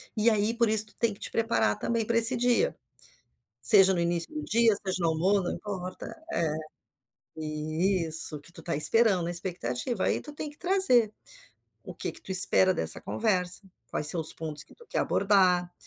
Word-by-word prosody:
e, 215 +2 +1
aí, 215 +1 -2
por 235 -1 -1
isso, 215 0 +5
tu - - -7
tem 230 -1 -1
que 200 - -15
te - - -7
preparar 225 - -2
também 230 -2 -3
pra 230 +1 -2
esse 230 +2 +7
dia, 245 - -1 0.9
seja 195 -3 +5
no - - -4
início 170 - -1
do 305 -1 -7
dia, 230 -1 0
seja 190 -2 -5
no 170 - -1
almoço, 185 +5 -1
não 175 - -5
importa. 185 -3 -10 0.2
É. 160 -3 -3 0.8
Isso. 155 +2 -1
O 145 - -11
que 170 - -13
tu - - -9
está 170 - -5
esperando, 180 +3 +4
expectativa, 175 - -6
aí - - -2
tu 295 - -9
tem 300 +1 -8
que 295 - -13
trazer. 305 - +2 0.7
O - - -12
que - - -5
que - - -8
tu - - -14
espera 185 0 +8
dessa - - -3
conversa, 185 -4 0 0.3
quais 150 - -3
são 165 +3 +2
os 160 - -2
pontos 155 -2 -10
que - - -23
tu 470 - -21
quer - - -5
abordar, 185 -3 -1
195 Hz, 195 wpm, -25 LUFS, 170-230 Hz, 0.9 s, espera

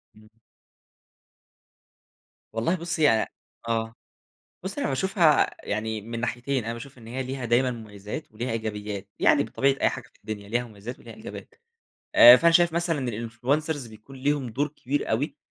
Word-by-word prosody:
إمم. 110 0 -18 2.2
والله 115 +10 +1
بُصي 170 -2 -2 0.2
ي - - -1 0.4
آه، 115 -1 -1 0.7
بُصي 195 +9 -4
أنا - - 0
باشوفها 160 +2 +3 0.2
يعني 110 +1 -2
من 115 +2 -6
ناحيتين، 120 +1 -1
أنا 115 - -2
باشوف 125 +3 -9
إن 115 - -13
هي 125 +3 -3
ليها 130 0 -5
دايمًا 120 +2 +3
مميِّزات 110 +3 -7
وليها 120 +4 -4
إيجابيات، 105 -3 -4
يعني - - +5
بطبيعة 135 0 +1
أي - - +4
حاجة - - -6
في - - -28
الدنيا 105 -2 -7
ليها 120 +3 0
مميِّزات 110 +1 -9
وليها - - -11
إيجابيات. - - -10 0.6
آآ، 120 +1 +11
فأنا 170 +4 +4
شايف 170 -1 +5
مثلًا 165 -7 0 0.2
الinfluencers 140 +4 -1
بيكون 110 +5 -13
ليهُم 140 0 0
دور 140 +6 -1
كبير 145 0 -3
أوي 130 +8 0
120 Hz, 155 wpm, -26 LUFS, 110-145 Hz, 2.2 s, آآ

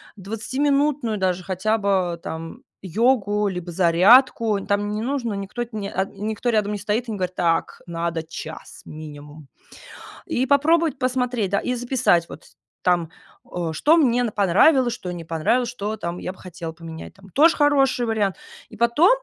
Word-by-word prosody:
двадцатиминутную 260 +4 -1
даже 185 -1 -1
хотя 195 +4 0
бы 185 -4 0
там 165 0 -7 0.2
йогу, 210 +1 +1
либо 180 -2 -4
зарядку". 200 +5 +4
Там 205 0 0
не 210 +1 -3
нужно, 245 -3 -2
никто, 200 +5 -4
э, - - -7
никто 210 +2 -3
рядом 210 -1 +1
не - - -2
стоит 215 +5 -2
и - - -4
не 210 - -4
говорит: 185 -1 -3
"Так, 165 -1 0
надо 170 -1 -2
час 160 0 -9
минимум". 150 -1 -10 0.8
И 255 - 0
попробовать 300 +1 +2
посмотреть, 250 -5 -1
да, 200 - +2
и 250 - -2
записать 245 -9 +1
вот 140 - -11 0.4
там, 175 -3 +2 0.4
о, 170 -2 -4
что 305 - +4
мне 245 -6 +3
понравилось, 230 - +4
что 185 -7 -6
не 170 -2 -6
понравилось, 200 +10 0
что 220 -2 -4
там 170 -3 -5
я 185 - -5
бы - - -21
хотела 170 -2 -7
поменять 165 0 -10
там. 195 -1 -17
Тоже 320 - +4
хороший 275 -4 +3
вариант. 210 -5 0 0.3
И 220 - -13
потом 235 - +4
205 Hz, 160 wpm, -22 LUFS, 175-245 Hz, 0.8 s, зарядку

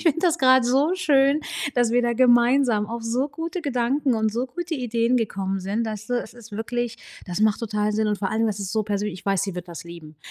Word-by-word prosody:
Ich - - -7
finde 330 -2 +3
das 345 -2 +2
grad 260 -2 +5
so 275 +8 +2
schön, 290 -4 +3 0.3
dass 245 -2 +2
wir 245 - +3
da 240 -1 +1
gemeinsam 240 -2 +4
auf 230 +1 -5
so 245 +5 -1
gute 330 +5 -5
Gedanken 265 -2 0
und 220 -1 0
so 245 +4 -1
gute 335 +6 -5
Ideen 240 -1 0
gekommen 195 -3 -2
sind, 205 +5 -2
dass 215 -1 -5
du 245 - -1
es - - -7
ist 230 -3 -15
wirklich, 230 +2 -3 0.3
das 180 +2 -4
macht 215 +1 +2
total 210 -2 -1
Sinn. 215 0 0
Und 210 - 0
vor 195 -1 -2
allem, 225 +1 +1
das 205 -1 -2
ist 195 -1 -4
so 220 -1 +1
persönlich, 205 -2 -3
ich - - -28
weiß, 195 -1 +2
sie 195 -2 -3
wird 180 0 -7
das 170 0 -8
lieben. 165 -3 -11
230 Hz, 245 wpm, -24 LUFS, 210-260 Hz, 0.3 s, grad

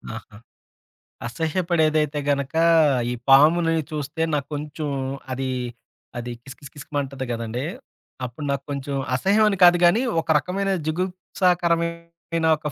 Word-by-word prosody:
ఆహా! 110 -2 -11 0.9
అసహ్యపడేదైతే 155 0 0
గనక 140 0 0 0.6
ఈ - - -2
పాముని 165 +5 +5 0.2
చూస్తే 150 +1 -4
నాక్కొంచం 150 +1 -4 0.4
అదీ 130 0 -2 0.7
అది 120 0 -5
కిస్ 135 +2 -11
కిస్ 140 -1 -12
కిస్‌మంటది 140 -2 -4
గదండీ! 115 +2 -4 0.6
అప్పుడు 125 +5 -7
నాక్కొంచం 140 0 -3 0.2
అసహ్యం 200 +9 +3
అని 195 - -2
కాదు 175 0 +8
గానీ 180 +8 +5 0.2
ఒక 165 - -12
రకమైన 195 +5 -2 0.2
జుగుప్సాకరమైన 170 -1 -1
ఒక 150 0 -5
155 Hz, 110 wpm, -23 LUFS, 140-170 Hz, 0.9 s, కాదు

